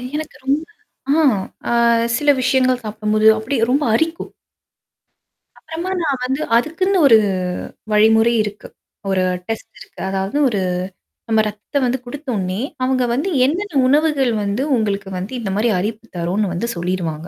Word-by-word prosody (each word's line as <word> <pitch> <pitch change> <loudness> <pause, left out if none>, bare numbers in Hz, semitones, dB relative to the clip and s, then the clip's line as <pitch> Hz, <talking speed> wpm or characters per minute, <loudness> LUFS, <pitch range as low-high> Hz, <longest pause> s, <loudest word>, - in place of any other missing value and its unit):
எனக்கு 310 -1 -5
ரொம்ப 285 +3 +1 0.6
ஆ - - +4 0.5
அ - - 0 0.5
சில 295 0 +1
விஷயங்கள் 255 -1 +2
சாப்பிடும்போது 215 0 +1
அப்டியே 230 +1 0
ரொம்ப 290 +2 +2
அரிக்கும். 325 +7 -1 1.3
அப்புறமா 340 +4 -5
நான் 275 -4 0
வந்து 265 +4 -2 0.2
அதுக்குன்னு 370 +8 +1
ஒரு 225 -3 +8 0.7
வழிமுறை 220 +2 +4
இருக்கு. 205 -1 -7 0.4
ஒரு 185 -1 +1 0.2
டெஸ்ட் 225 -1 -6
இருக்கு. - - -14
அதாவது 195 +6 -2
ஒரு 205 -5 0 0.7
நம்ம 220 -1 +4
ரத்தம் 215 +7 -3
வந்து 250 +1 0
குடுத்த 290 +4 -9
ஒன்னே, 185 +1 -2 0.2
அவங்க 255 -1 +1
வந்து 290 +10 -1 0.2
என்னென்ன 335 0 -1
உணவுகள் 290 -3 +2
வந்து 205 +6 -1
உங்களுக்கு 200 -3 -2
வந்து 190 +8 -5
இந்த 210 -4 -4
மாரி 230 +2 +2
அரிப்பு 220 +3 -4
தரும்ன்னு 180 +3 -1
வந்து 180 +7 -2
சொல்லிருவாங்க. 170 -2 -3
230 Hz, 140 wpm, -19 LUFS, 205-280 Hz, 1.3 s, ஒரு